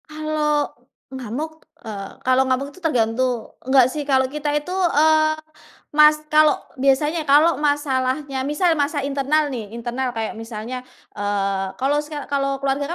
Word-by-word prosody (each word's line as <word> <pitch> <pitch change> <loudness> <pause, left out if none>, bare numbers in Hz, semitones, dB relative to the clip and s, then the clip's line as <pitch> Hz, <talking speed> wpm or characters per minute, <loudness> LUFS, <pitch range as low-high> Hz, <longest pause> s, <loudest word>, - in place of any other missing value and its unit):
Kalau 305 -1 -1 0.4
ngamuk, 265 +6 -6 0.2
eee, 200 -3 -6
kalau 260 +1 +4
ngamuk 265 +2 -1
itu 330 - -16
tergantung 245 -5 0 0.2
enggak 260 -1 +6
sih 295 0 -5
kalau 265 -2 +3
kita 300 0 -3
itu 295 +4 -2
eee 315 -4 +3 0.6
mas 300 0 +7 0.2
kalau 305 -1 +5 0.2
biasanya 295 +4 +1
kalau 300 +4 +5
masalahnya 275 -2 0
misal 315 +4 +2
masa 285 0 0
internal 285 +2 0
nih, 230 -5 -5
internal 245 +1 -3
kayak 225 0 -4
misalnya, 225 +2 -6 0.3
eee, 200 -2 -1
kalau 275 +6 +1
seka 295 -1 -7
kalau 275 -1 -1
keluarga 275 +1 0
275 Hz, 140 wpm, -21 LUFS, 255-300 Hz, 0.6 s, mas